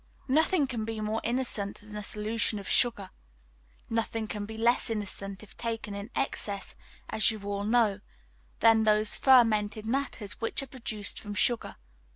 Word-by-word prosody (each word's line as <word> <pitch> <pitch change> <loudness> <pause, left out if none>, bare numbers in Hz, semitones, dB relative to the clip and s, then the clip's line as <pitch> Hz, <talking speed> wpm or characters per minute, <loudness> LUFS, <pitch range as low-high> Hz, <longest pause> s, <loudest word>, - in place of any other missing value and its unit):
Nothing 315 +3 +3
can 240 -4 -3
be 225 0 -4
more 215 +1 -2
innocent 235 -5 -1
than 210 0 -11
a 210 - -4
solution 210 +1 +1
of 200 - -7
sugar; 215 -6 +2 0.8
nothing 225 0 -1
can 205 -1 -5
be 220 0 -7
less 235 +2 +2
innocent, 200 -2 -5
if 210 - -15
taken 225 -3 -4
in 200 +2 -6
excess, 200 -7 -2 0.4
as 220 - +4
you 220 -1 -3
all 200 0 -3
know, 220 -3 +3 0.6
than 225 -1 +6
those 215 0 +3
fermented 220 -5 +4
matters 230 -5 -3
which 225 +4 -1
are - - -6
produced 230 -5 -4
from 205 -1 -7
sugar. 240 +2 +1
220 Hz, 160 wpm, -29 LUFS, 205-230 Hz, 0.8 s, than